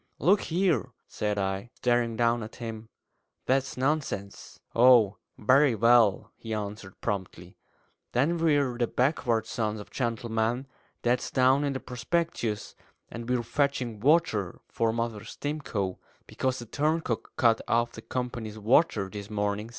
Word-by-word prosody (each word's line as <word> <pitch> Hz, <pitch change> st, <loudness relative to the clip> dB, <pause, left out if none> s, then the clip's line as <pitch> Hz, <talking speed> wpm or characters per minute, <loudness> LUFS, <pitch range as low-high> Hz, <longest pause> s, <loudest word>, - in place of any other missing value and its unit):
"Look 195 Hz, +4 st, +4 dB
here," 170 Hz, -, 0 dB
said 105 Hz, -1 st, -2 dB
I, 95 Hz, +3 st, -2 dB
staring 120 Hz, -2 st, +1 dB
down 120 Hz, 0 st, +2 dB
at 110 Hz, +1 st, -8 dB
him, 115 Hz, -2 st, -7 dB, 0.6 s
"that's 135 Hz, +1 st, 0 dB
nonsense!" 130 Hz, -8 st, -2 dB
"Oh, 120 Hz, -4 st, +6 dB, 0.2 s
very 130 Hz, +3 st, +4 dB
well," 115 Hz, -2 st, +4 dB
he 110 Hz, -1 st, -4 dB
answered 100 Hz, -2 st, -6 dB
promptly; 95 Hz, -3 st, -4 dB, 0.6 s
"then 145 Hz, +8 st, +2 dB
we're 145 Hz, -6 st, +2 dB
the 120 Hz, -, +2 dB
'Backward 125 Hz, -4 st, +1 dB
Sons 110 Hz, -2 st, -2 dB
of 105 Hz, -, -11 dB
Gentlemen' 115 Hz, 0 st, -1 dB, 0.4 s
that's 120 Hz, +1 st, +1 dB
down 130 Hz, +2 st, +3 dB
in 140 Hz, -1 st, 0 dB
the 130 Hz, -, -3 dB
prospectus 125 Hz, -3 st, -2 dB, 0.4 s
and 115 Hz, +1 st, -7 dB
we're 125 Hz, -1 st, +1 dB
fetching 130 Hz, -4 st, -1 dB
water 125 Hz, -, +2 dB
for 115 Hz, -1 st, 0 dB
Mother 115 Hz, -2 st, -3 dB
Stimcoe, 130 Hz, -11 st, -4 dB, 0.3 s
because 130 Hz, 0 st, -2 dB
the 120 Hz, -, -7 dB
turncock 150 Hz, -1 st, -1 dB
cut 115 Hz, -2 st, +3 dB
off 120 Hz, 0 st, +2 dB
the -, -, -10 dB
company's 120 Hz, -4 st, -4 dB
water 110 Hz, -, +3 dB
this 100 Hz, +1 st, -8 dB
morning! 105 Hz, +1 st, -2 dB
120 Hz, 135 wpm, -28 LUFS, 110-130 Hz, 0.6 s, Oh